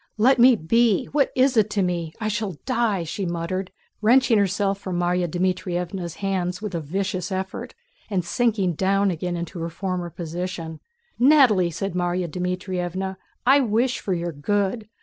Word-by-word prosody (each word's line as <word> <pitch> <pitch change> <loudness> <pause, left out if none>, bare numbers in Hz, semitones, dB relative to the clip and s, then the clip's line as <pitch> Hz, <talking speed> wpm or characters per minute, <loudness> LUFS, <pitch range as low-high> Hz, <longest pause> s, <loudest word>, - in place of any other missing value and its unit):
"Let 250 +4 +4
me 250 +1 +7
be!... 220 +4 +2
What 285 -1 +2
is 260 0 +3
it 215 -1 +4
to 205 -2 0
me?... 170 -3 -2
I 215 - -2
shall 210 -5 -2
die!" 230 -8 +1
she 165 +5 -4
muttered, 175 +2 -3 0.3
wrenching 240 0 +5
herself 200 0 +1
from 185 -3 -3
Márya 175 0 +1
Dmítrievna's 180 0 -2
hands 185 -2 -2
with 210 -2 -5
a 170 - -1
vicious 185 +5 -3
effort 190 0 -4 0.3
and 185 -5 -1
sinking 210 -4 +1
down 195 +3 +2
again 175 +1 -3
into 170 +1 -5
her 165 +1 -3
former 180 0 -3
position. 170 -1 -5 0.4
"Natalie!" 245 - +5
said 195 +3 -4
Márya 175 0 -1
Dmítrievna. 180 +2 -3 0.3
"I 270 +3 +6
wish 245 +1 +1
for 190 - -1
your 170 0 -3
good. 205 +8 -1
190 Hz, 160 wpm, -23 LUFS, 175-215 Hz, 0.4 s, me